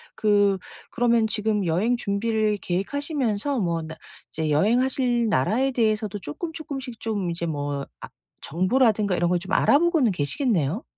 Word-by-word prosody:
그, 205 -2 +2 0.3
그러면 235 -2 +2
지금 210 -2 0
여행 195 +9 +1
준비를 215 0 0
계획하시면서 255 - -2
뭐 170 -3 -1
나 160 0 -8 0.3
이제 155 -1 -2
여행하실 240 - +2
나라에 225 - +1
대해서도 215 -3 0
쪼끔쪼끔씩 270 - -6
좀 200 -6 -2
이제 170 0 -3
뭐 145 -2 -3 0.2
아 - - -8 0.3
정보라든가 205 - +2
이런 175 0 +1
걸 180 - +2
좀 190 +3 -9
알아보고는 300 - +3
계시겠네요? 180 - -1
210 Hz, 335 characters per minute, -24 LUFS, 175-245 Hz, 0.3 s, 알아보고는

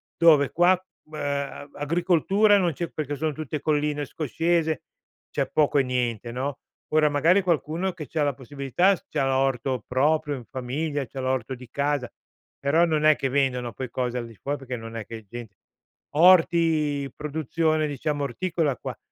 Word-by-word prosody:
dove 155 -4 +5
qua, 175 +2 +4 0.3
mhmm, 155 - -25
uhm, 140 0 -3
agricoltura 175 +6 +3
non 175 -3 +2
c'è 170 +4 -3
perché 145 -2 -3
sono 155 +2 -1
tutte 150 0 -5
colline 150 -1 0
scoscese, 160 +2 -1 0.5
c'è - - -1
poco 150 -1 +3
e - - +4
niente, 120 -3 -2
no. 135 +3 -3 0.3
Ora 155 -1 +4
magari 165 +7 +4
qualcuno 170 +1 -1
che 165 -3 -7
c'ha 155 +5 -2
la 145 -3 +1
possibilità 140 +8 +1
s - - -17
c'ha 135 - 0
l'orto 130 -2 0
proprio 150 +3 +1
in 125 - -9
famiglia, 140 +4 -3
c'ha 135 - -8
l'orto 130 -1 -1
di 125 0 -12
casa, 140 -2 0 0.5
però 145 +5 +2
non 155 -2 0
è 155 0 +7
che 135 - -2
vendono 125 -3 0
poi 130 +4 -5
cose 125 -1 -2
al 120 - -3
di 115 - -13
fuor 140 +6 -3
perché 130 -2 -6
non 115 -1 -8
è 110 -2 -5
che 115 - -7
è 110 - -14
gent 115 -1 -9 0.6
orti, 160 -5 +4
produzione, 155 +1 0
diciamo, 145 +1 -2
orticola 155 +1 -1
qua. - - -6
145 Hz, 175 wpm, -25 LUFS, 130-160 Hz, 0.6 s, è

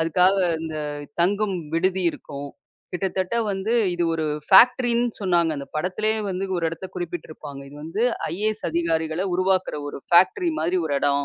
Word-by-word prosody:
அதுக்காக 180 +4 +3 0.2
அந்த 160 -1 -5 0.5
தங்கும் 200 +2 +1 0.2
விடுதி 185 +2 +1
இருக்கும். 140 -2 -8 0.4
கிட்டத்தட்ட 190 +3 -2 0.2
வந்து 195 +3 -2 0.2
இது 175 0 0
ஒரு 160 -1 -1 0.2
ஃபாக்ட்டிரின்னு 240 +3 +5
சொன்னாங்க. 175 -4 +2
அந்தப் 140 0 -9
படத்துலே 190 +7 0 0.2
வந்து 190 +1 -2
ஒரு 170 - -2
இடத்த 165 +3 -6
குறிப்பிட்டு 175 -2 -5
இருப்பாங்க. 145 -3 -9
இது 145 - -13
வந்து 165 +8 -2 0.3
ஐஏஎஸ் 215 +4 -2
அதிகாரிகள 165 +1 0
உருவாக்குற 185 -3 +1
ஒரு - - -7
ஃபாக்ட்டிரி 190 - +4
மாரி 175 +3 +1
ஒரு 145 - -1
இடம். 140 0 +2
180 Hz, 150 wpm, -23 LUFS, 160-195 Hz, 0.5 s, ஃபாக்ட்டிரின்னு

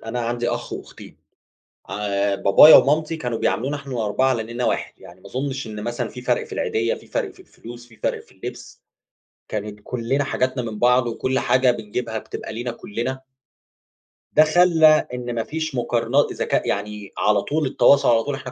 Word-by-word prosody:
أنا 115 +2 -4
عندي 120 0 -2
أخ - - -4
وأختين، - - -10 0.7
عا 100 0 -1
بابايا 100 +10 +8
ومامتي 155 +3 +2
كانوا 120 -6 -3
بيعاملونا 135 +6 -1
إحنا 140 -2 -9
ال4 115 +2 +1
على 120 -4 0
إننا 120 +1 -2
واحد - - -1
يعني 95 -1 -14
ما 100 - -15
أظُنش 135 +4 -4
إن 105 -1 -7
مثلًا 120 0 -3
في 125 - -10
فَرق 125 -1 0
في - - -14
العيدية، 115 +1 -1
في - - -14
فَرق - - -2
في - - -18
الفلوس، 120 +1 -12
في 115 - -19
فَرق - - -2
في - - -24
اللبس، - - -9 0.7
كانت 105 0 -5
كُلّنا 125 +5 -1
حاجاتنا 130 -1 -1
من 110 -2 -6
بعض، 125 +1 +3
وكُلّ 130 +3 -1
حاجة 130 -1 +3
بنجيبها 110 0 -4
بتبقى - - -7
لنا 120 - -3
كُلّنا. 120 +3 -5 1.1
ده 155 - +7
خلّى 160 -1 +5
إن 120 -1 -4
ما 115 - -1
فيش 160 0 -4
مُقارنا 120 +3 +1
إذا - - -3
كاء - - 0
يعني 105 0 -4
على 105 -1 +2
طول 150 +6 -1
التواصل، 140 +1 +4
على 115 -1 +4
طول 145 - -3
إحنا 130 -1 -8
120 Hz, 185 wpm, -22 LUFS, 110-135 Hz, 1.1 s, بابايا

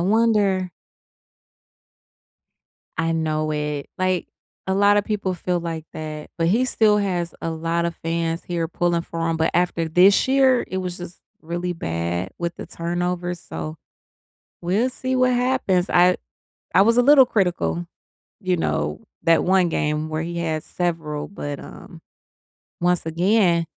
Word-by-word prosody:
wonder. 200 -2 +2 2.3
I 165 +1 +1
know 155 -1 0
it. 150 -1 -3
Like, 185 -1 0 0.4
a 190 - +1
lotta 205 +1 +4
people 200 -3 -2
feel 180 0 -1
like 165 -2 -5
that, 155 -1 -6
but 165 - +1
he 225 +8 +3
still 220 -4 +3
has 180 -5 -1
a 165 - -2
lot 165 +1 -1
of 170 -1 -3
fans 165 0 -1
here 170 -2 -2
pulling 170 0 0
for 165 0 -4
him, 165 - 0
but 160 - +2
after 170 -2 +1
this 185 +8 +5
year, 265 -2 +4
it 185 - -4
was 180 -2 -3
just 175 0 -9 0.2
really 175 +2 -3
bad 85 - -3
with 170 0 -3
the - - -7
turnovers, 175 +1 -3
so 155 -1 -6 0.9
we'll 200 +8 +1
see 260 0 -3
what 255 0 +3
happens. 245 -8 +1
I 180 +1 +5 0.6
I 185 - +7
was 230 +3 +3
a - - +7
little 275 +1 +7
critical, 180 -5 0 0.5
you 185 -2 +1
know, 75 - -1 0.2
that 165 -1 +4
one 185 -1 +3
game 150 0 -1
where 155 0 -2
he 170 +1 -4
has 160 -2 -2
several, 160 -4 -3
but, 145 -7 -6
um, - - -12 0.8
once 175 -1 +1
again 175 +1 +2
175 Hz, 150 wpm, -22 LUFS, 165-190 Hz, 2.3 s, I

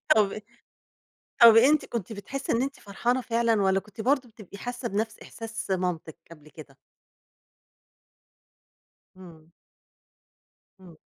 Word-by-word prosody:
طَب 210 -1 +2 1.0
طَب 230 -1 +10
أنتِ 280 +7 +5
كنتِ 225 -2 -5
بتحسّي 270 +7 -5
إن 230 - +1
أنتِ 275 +1 -4
فرحانة 240 +6 -1
فعلًا 230 -2 +1
والّا 190 0 +2
كنتِ 210 +2 -10
برضه 260 +1 +1
بتبقى 210 -3 -13
حاسّة 245 +2 -5
بنَفْس 215 +1 -3
إحساس 225 -3 -7
مامتِك 180 -4 -2
قبل 155 -2 -14
كده؟ 145 -3 -14 2.4
إمم. 165 -3 -15 1.3
إمم. 175 -4 -15
215 Hz, 115 wpm, -26 LUFS, 185-235 Hz, 2.4 s, طَب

